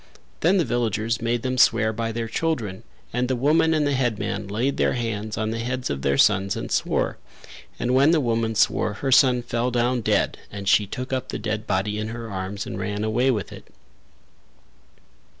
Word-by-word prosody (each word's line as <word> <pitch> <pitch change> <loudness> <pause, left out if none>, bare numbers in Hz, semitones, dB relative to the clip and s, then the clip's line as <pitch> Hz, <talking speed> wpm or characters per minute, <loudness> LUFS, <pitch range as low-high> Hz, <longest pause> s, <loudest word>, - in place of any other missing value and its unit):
Then 180 +5 +3
the 175 - +2
villagers 115 -1 -1
made 115 0 -1
them 130 -1 -1
swear 110 -2 +4
by 115 +1 -2
their 115 0 -3
children 115 -7 -2 0.3
and 125 +1 0
the 130 - 0
woman 155 +6 +3
and 155 -2 +2
the 145 - +1
headman 110 -6 -1
laid 120 +8 -1
their - - +2
hands 110 -3 -3
on 110 0 -1
the 115 - -3
heads 125 +2 -2
of 70 -1 -3
their 70 0 +1
sons 100 +3 +3
and - - -5
swore; - - 0 0.6
and 125 +1 -1
when 135 +3 +5
the 165 -1 +4
woman 115 -3 0
swore 105 - +2
her 135 +5 -3
son 125 -2 +5
fell 120 +1 -1
down 120 0 +1
dead - - +1
and 100 -1 -7
she 105 +1 +4
took 125 +6 -5
up 130 - -2
the - - -3
dead 110 -1 -3
body 105 +3 -1
in 110 - -3
her 115 -1 -6
arms 95 +2 -4
and - - -6
ran 105 0 -3
away 120 +4 +1
with 110 -6 -1
it. - - -12
115 Hz, 200 wpm, -24 LUFS, 105-130 Hz, 0.6 s, when